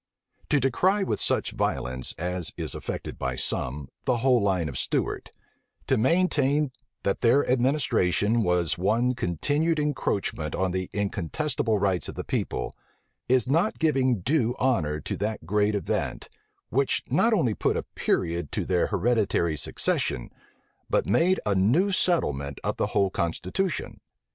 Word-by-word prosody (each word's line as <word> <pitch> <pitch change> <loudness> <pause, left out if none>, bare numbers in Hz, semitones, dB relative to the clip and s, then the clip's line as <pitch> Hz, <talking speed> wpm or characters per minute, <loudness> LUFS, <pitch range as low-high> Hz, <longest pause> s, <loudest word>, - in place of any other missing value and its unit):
To 145 - +4
decry 185 +10 +2
with - - -2
such - - 0
violence, 65 0 -2
as 90 -1 -3
is - - -2
affected - - -5
by 65 -1 -2
some, 65 +2 -2 0.2
the 125 - +2
whole 125 0 +3
line 95 -5 +1
of 70 - -6
Stuart; - - -2 0.5
to 130 - +2
maintain, 145 +1 +2 0.3
that 100 - 0
their 125 +4 +4
administration 120 -5 +2
was 90 -4 +1
one 115 +7 +2
continued 145 - 0
encroachment 105 - -1
on 95 -1 0
the 95 0 -2
incontestable 105 - -1
rights 95 -3 0
of - - -7
the - - -4
people; 60 - -3 0.5
is 125 -2 +3
not 165 +10 +1
giving 130 - +2
due 125 - +1
honor 80 - +1
to - - -4
that 105 -3 -3
great 105 +3 +1
event, 100 - -2 0.4
which 135 +2 +1
not 225 - +3
only 165 - +2
put - - 0
a - - -2
period 85 -3 -1
to - - -1
their 90 -2 +1
hereditary 105 -8 +1
succession, 65 -3 -1 0.6
but - - +2
made 185 +3 +3
a 105 - +2
new 125 - +3
settlement 75 - 0
of - - -2
the - - +1
whole 100 -1 +1
constitution. 90 - -2
110 Hz, 145 wpm, -26 LUFS, 90-140 Hz, 0.6 s, To